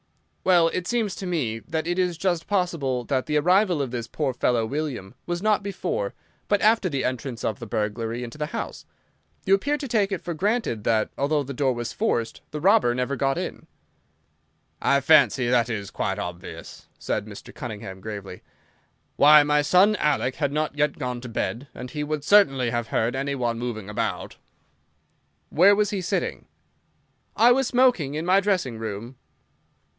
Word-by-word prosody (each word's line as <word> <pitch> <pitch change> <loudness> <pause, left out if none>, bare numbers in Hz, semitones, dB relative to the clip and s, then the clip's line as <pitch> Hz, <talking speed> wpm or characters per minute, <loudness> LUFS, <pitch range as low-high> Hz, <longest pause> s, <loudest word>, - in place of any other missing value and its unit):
"Well, 175 -3 +5
it 180 +1 -3
seems 225 -5 0
to 190 - -5
me 130 -11 -1
that 160 +7 -4
it 175 +2 -1
is 180 -2 0
just 175 -2 -1
possible 165 -10 0
that 130 0 -1
the 150 -1 +1
arrival 180 +2 +3
of 135 -4 -2
this 120 -2 -4
poor 140 +1 -2
fellow 120 -2 +1
William 135 -7 -4
was 175 +2 -3
not 215 -2 +3
before, 465 - -3 0.3
but 205 - +2
after, 215 -3 +3
the 140 -4 -2
entrance 125 -2 -3
of 110 - -2
the 120 - -7
burglar 110 +2 -2
into 120 +4 -6
the 150 - -1
house. - - -6 0.6
You 195 - +3
appear 285 +10 +2
to 280 - -5
take 210 -4 +1
it 190 - -1
for 175 - -3
granted 200 - -1
that, 110 -2 +1
although 145 +1 +1
the 140 +1 -6
door 135 0 +1
was 120 -1 -5
forced, 115 - -1
the 150 - -5
robber 190 - +4
never 125 +2 -1
got 135 0 0
in." - - -5 1.1
"I 140 - +3
fancy 135 -4 +4
that 120 -1 +2
is 100 -4 -4
quite 95 -1 -2
obvious," 90 -2 -8
said 105 - -3
Mr. 100 -2 -11
Cunningham, 100 -5 -7
gravely. 100 -3 -7 0.8
"Why, 150 +1 +8
my 150 0 +2
son 185 +8 +4
Alec 145 -5 0
had 145 -3 0
not 150 0 -1
yet 150 -1 0
gone 125 -3 -4
to 125 - -8
bed, 120 +3 -3
and 125 0 -8
he 150 -1 -3
would 150 -1 -3
certainly 135 - +4
have 120 -1 -2
heard 115 +3 0
any 140 +1 -2
one 120 -3 -1
moving 115 -4 -4
about." 105 - -3 1.1
"Where 190 +6 +5
was 210 0 +1
he 200 -2 -2
sitting?" 180 - -2 0.9
"I 240 +2 +6
was 265 +1 +3
smoking 245 - +2
in 155 +2 -3
my 185 +2 +5
dressing 185 - -1
room." 110 +3 -6
145 Hz, 180 wpm, -24 LUFS, 120-185 Hz, 1.1 s, Why